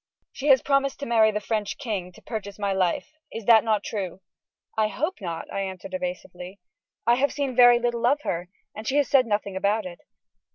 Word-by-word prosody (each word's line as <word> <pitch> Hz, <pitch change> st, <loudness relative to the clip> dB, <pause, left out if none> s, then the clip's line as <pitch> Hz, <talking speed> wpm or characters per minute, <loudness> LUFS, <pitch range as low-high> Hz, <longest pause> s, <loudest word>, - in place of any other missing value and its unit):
"She 280 Hz, -, -5 dB
has 265 Hz, -3 st, +6 dB
promised 275 Hz, -1 st, +1 dB
to -, -, -2 dB
marry 225 Hz, -3 st, +4 dB
the 210 Hz, -1 st, -1 dB
French 210 Hz, -1 st, -2 dB
king 210 Hz, -10 st, -4 dB
to -, -, -17 dB
purchase 205 Hz, -3 st, -6 dB
my 200 Hz, -1 st, -1 dB
life. 185 Hz, -2 st, 0 dB, 0.2 s
Is 225 Hz, -2 st, -7 dB
that 225 Hz, -1 st, +7 dB
not 215 Hz, -3 st, +1 dB
true?" 190 Hz, -3 st, -5 dB, 0.5 s
"I 220 Hz, -1 st, +2 dB
hope 300 Hz, -, -3 dB
not," 165 Hz, -3 st, -4 dB
I -, -, -2 dB
answered, 190 Hz, -1 st, -5 dB
evasively; 180 Hz, +1 st, -6 dB, 0.5 s
"I 235 Hz, -, +5 dB
have 280 Hz, +2 st, +2 dB
seen 280 Hz, -3 st, -2 dB
very 245 Hz, -1 st, +8 dB
little 240 Hz, 0 st, 0 dB
of 290 Hz, +3 st, +2 dB
her, 175 Hz, -7 st, -3 dB, 0.2 s
and 215 Hz, +1 st, -8 dB
she 275 Hz, -, +1 dB
has 290 Hz, -3 st, +3 dB
said 260 Hz, -3 st, +4 dB
nothing 205 Hz, -2 st, -1 dB
about 200 Hz, +2 st, 0 dB
it." 175 Hz, -1 st, -8 dB
215 Hz, 205 wpm, -25 LUFS, 190-245 Hz, 0.5 s, very